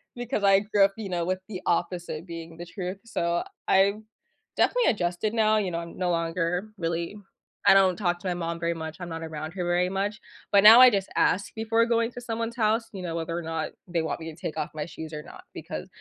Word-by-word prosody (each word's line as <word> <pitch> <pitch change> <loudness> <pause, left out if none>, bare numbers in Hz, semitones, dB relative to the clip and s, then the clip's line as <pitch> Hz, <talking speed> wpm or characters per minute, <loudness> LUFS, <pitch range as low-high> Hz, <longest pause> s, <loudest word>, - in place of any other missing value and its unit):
because 245 -3 -3
I 195 -1 +6
grew 205 -1 +3
up, 195 - -1
you 215 -3 -5
know, 175 -2 -1
with 185 +1 -1
the 185 -3 -6
opposite 175 -2 -1
being 165 -1 -8
the 175 - -7
truth. 185 +2 -5
So 170 -6 -1 0.2
I've 195 +1 +4 0.6
definitely - - +3
adjusted 185 +1 -1
now, 215 -1 +3
you 195 -4 0
know, 170 - -2
I'm 170 0 -8
no 180 -1 0
longer 170 +3 -1
really 170 +3 -3 0.5
I - - +8
don't 190 -2 +5
talk 175 -3 0
to 185 - -6
my 180 - +1
mom 170 -1 -3
very 170 0 0
much. 160 -1 -6
I'm 175 - -6
not 165 0 -5
around 155 -1 -5
her 180 -1 -3
very 175 +1 +2
much, 195 +2 -2 0.3
but 200 -1 +5
now 225 +4 +11
I 255 - +10
just 195 -4 -1
ask 200 +3 +1
before 225 +1 +2
going 230 0 +1
to 245 - -7
someone's 230 0 -3
house, 225 0 +1
you 190 - -6
know, 165 -2 -3
whether 165 0 -3
or 175 - -4
not 160 0 -3 0.2
they 170 -1 0
want 160 - -3
me 160 0 -6
to - - -13
take - - -5
off 150 - -3
my 150 -1 -3
shoes 160 -1 -8
or 150 - -5
not - - -13
because - - -6
180 Hz, 235 wpm, -26 LUFS, 170-210 Hz, 0.6 s, now